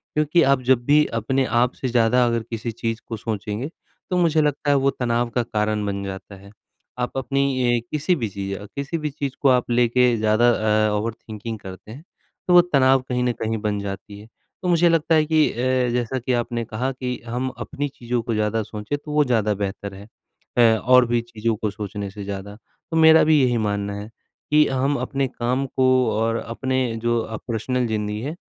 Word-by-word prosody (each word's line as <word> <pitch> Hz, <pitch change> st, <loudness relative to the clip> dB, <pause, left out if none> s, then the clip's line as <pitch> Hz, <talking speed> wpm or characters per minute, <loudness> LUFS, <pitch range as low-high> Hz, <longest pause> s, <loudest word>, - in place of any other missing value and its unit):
क्योंकि 155 Hz, +3 st, +3 dB
आप 135 Hz, -1 st, +3 dB
जब 125 Hz, -1 st, +2 dB
भी 150 Hz, +1 st, +5 dB
अपने 130 Hz, +4 st, 0 dB
आप 125 Hz, 0 st, +1 dB
से 130 Hz, -, -4 dB
ज़्यादा 120 Hz, +1 st, +3 dB
अगर 115 Hz, -1 st, 0 dB
किसी 115 Hz, 0 st, -4 dB
चीज़ 115 Hz, 0 st, -4 dB
को 115 Hz, -, -4 dB
सोचेंगे, 105 Hz, +3 st, -4 dB, 0.4 s
तो 180 Hz, -, 0 dB
मुझे 160 Hz, -3 st, +3 dB
लगता 145 Hz, 0 st, 0 dB
है 145 Hz, -, +5 dB
वो 135 Hz, 0 st, +2 dB
तनाव 120 Hz, -2 st, -1 dB
का 120 Hz, -, +2 dB
कारण 105 Hz, -1 st, -1 dB
बन 100 Hz, -1 st, -3 dB
जाता 100 Hz, 0 st, -7 dB
है। 100 Hz, +1 st, -15 dB, 0.5 s
आप 125 Hz, +2 st, -3 dB
अपनी 130 Hz, -2 st, +1 dB
अ, -, -, -10 dB
किसी 155 Hz, +4 st, +1 dB
भी 120 Hz, -8 st, -2 dB
चीज़ 100 Hz, 0 st, -5 dB, 0.2 s
किसी 140 Hz, +4 st, -3 dB
भी 155 Hz, -1 st, -3 dB
चीज़ 140 Hz, -1 st, -5 dB
को 140 Hz, -, +4 dB
आप 125 Hz, -1 st, +2 dB
लेके 120 Hz, 0 st, +3 dB
ज़्यादा 110 Hz, +3 st, +3 dB, 0.4 s
अ, -, -, -1 dB
ओवरथिंकिंग 110 Hz, 0 st, -5 dB
करते 95 Hz, +2 st, -10 dB
हैं, 135 Hz, +7 st, -10 dB, 0.4 s
तो 180 Hz, -, +3 dB
वो 175 Hz, -, +9 dB
तनाव 135 Hz, -6 st, +3 dB
कहीं 125 Hz, 0 st, 0 dB
न 125 Hz, -, +2 dB
कहीं 110 Hz, 0 st, -1 dB
बन 105 Hz, -2 st, -1 dB
जाती 100 Hz, +1 st, -7 dB
है। 105 Hz, -, -13 dB, 0.3 s
तो 180 Hz, -, -3 dB
मुझे 175 Hz, 0 st, +4 dB
लगता 165 Hz, 0 st, +2 dB
है 155 Hz, -1 st, +4 dB
कि 155 Hz, 0 st, +3 dB
अ, -, -, -12 dB, 0.4 s
जैसा 125 Hz, +1 st, -1 dB
कि 125 Hz, +1 st, -2 dB
आपने 120 Hz, -1 st, -1 dB
कहा 125 Hz, +5 st, -2 dB
कि 125 Hz, -1 st, -4 dB
हम 125 Hz, +3 st, -2 dB
अपनी 145 Hz, +1 st, -4 dB
चीज़ों 120 Hz, -2 st, -3 dB
को 115 Hz, -, -3 dB
ज़्यादा 110 Hz, +1 st, 0 dB
सोचे, 105 Hz, +6 st, -5 dB
तो 150 Hz, +1 st, -10 dB
वो 150 Hz, 0 st, +4 dB
ज़्यादा 110 Hz, -4 st, +1 dB
बेहतर 100 Hz, 0 st, -4 dB
है, 100 Hz, +2 st, -11 dB, 0.5 s
ए 115 Hz, -2 st, +6 dB
और 125 Hz, +2 st, +5 dB
भी 120 Hz, 0 st, +1 dB
चीज़ों 115 Hz, -1 st, -2 dB
को 105 Hz, 0 st, -2 dB
सोचने 100 Hz, -1 st, -5 dB
से 100 Hz, 0 st, -8 dB
ज़्यादा। 100 Hz, +1 st, -6 dB, 0.4 s
तो 165 Hz, -, 0 dB
मेरा 160 Hz, 0 st, +7 dB
भी 155 Hz, -2 st, +4 dB
यही 125 Hz, -2 st, +2 dB
मानना 100 Hz, -2 st, -1 dB
है, 105 Hz, -, -8 dB, 0.4 s
कि 150 Hz, 0 st, +6 dB
हम 135 Hz, +2 st, 0 dB
अपने 135 Hz, -1 st, -1 dB
काम 125 Hz, +2 st, -2 dB
को 130 Hz, 0 st, 0 dB, 0.3 s
और 115 Hz, +1 st, 0 dB
अपने 130 Hz, +3 st, -2 dB, 0.2 s
जो 120 Hz, 0 st, +2 dB
अ, 110 Hz, 0 st, -5 dB
पर्सनल 125 Hz, +2 st, -1 dB
ज़िंदगी 105 Hz, -1 st, -2 dB
है, 145 Hz, +7 st, -4 dB
120 Hz, 205 wpm, -22 LUFS, 110-135 Hz, 0.5 s, वो